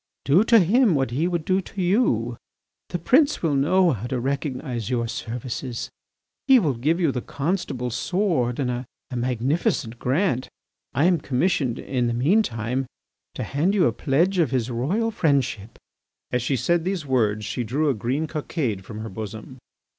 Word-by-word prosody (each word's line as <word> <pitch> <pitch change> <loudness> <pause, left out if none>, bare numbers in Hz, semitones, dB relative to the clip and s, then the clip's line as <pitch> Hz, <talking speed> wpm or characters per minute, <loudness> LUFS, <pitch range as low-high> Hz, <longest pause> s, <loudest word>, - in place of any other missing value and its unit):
"Do 160 +9 +5
to 230 0 +6
him 210 +1 +4
what 135 -3 0
he 150 +8 0
would 170 -3 -2
do 190 +1 +2
to 195 - -10
you. 175 - +1 0.5
The - - -2
prince 280 - +3
will 160 -3 +2
know 170 +6 +3
how 115 -1 -3
to 130 0 -2
recognise 130 -3 -3
your 120 -2 0
services, 120 +2 -5 0.6
He 270 -1 +8
will 160 - +2
give 150 +9 0
you 165 -6 +2
the 125 - -3
Constable's 135 - -2
sword 170 - 0
and 130 -3 0
a 120 0 -4 0.3
magnificent 125 - -1
grant. 130 -1 0 0.5
I 140 +6 +3
am 175 -2 +4
commissioned, 135 -2 0
in 125 -3 -1
the 120 - -1
mean 160 - +4
time, 125 - -2 0.5
to - - -3
hand 165 +9 0
you 190 - +4
a 120 - +2
pledge 170 - +1
of 160 -6 +3
his 125 -1 -1
royal 185 - 0
friendship." 135 - 0 0.5
As 125 - +1
she 130 +3 0
said 165 +8 +1
these 185 -3 -2
words 110 -6 +1
she 125 - -2
drew 140 +8 0
a 140 - +3
green 130 +8 -1
cockade 145 - -3
from 110 +2 -8
her 110 - -5
bosom. 110 +5 -8
135 Hz, 175 wpm, -24 LUFS, 120-175 Hz, 0.6 s, He